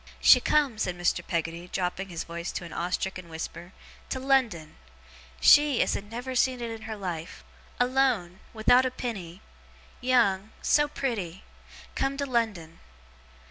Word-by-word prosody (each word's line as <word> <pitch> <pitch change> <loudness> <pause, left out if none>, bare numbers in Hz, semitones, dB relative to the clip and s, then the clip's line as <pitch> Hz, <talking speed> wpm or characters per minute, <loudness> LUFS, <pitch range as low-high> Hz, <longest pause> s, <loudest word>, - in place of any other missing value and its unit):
'She - - +7
come,' 285 -7 +2
said 180 -4 -1
Mr. 175 0 +1
Peggotty, 170 0 -3
dropping 190 +1 -2
his 170 -2 -4
voice 170 +1 -5
to 175 - -5
an 170 - -9
awe 175 +1 -2
stricken 185 -1 -3
whisper, 170 +2 -7 0.4
'to 260 - -2
London. 245 - 0 0.6
She 290 - +6
as - - -1
had 205 +1 -5
never 245 +3 -5
seen 255 0 +2
it 235 -1 -4
in 225 -1 -7
her 220 - -3
life 180 -4 -6 0.4
alone 245 -8 +1
without 235 +3 +4
a 260 - +1
penny 200 -8 -6 0.6
young 220 -5 +2
so 295 0 +4
pretty 205 - -4 0.5
come 270 0 -1
to 280 - -1
London. 215 -11 -2
210 Hz, 150 wpm, -27 LUFS, 175-255 Hz, 0.6 s, She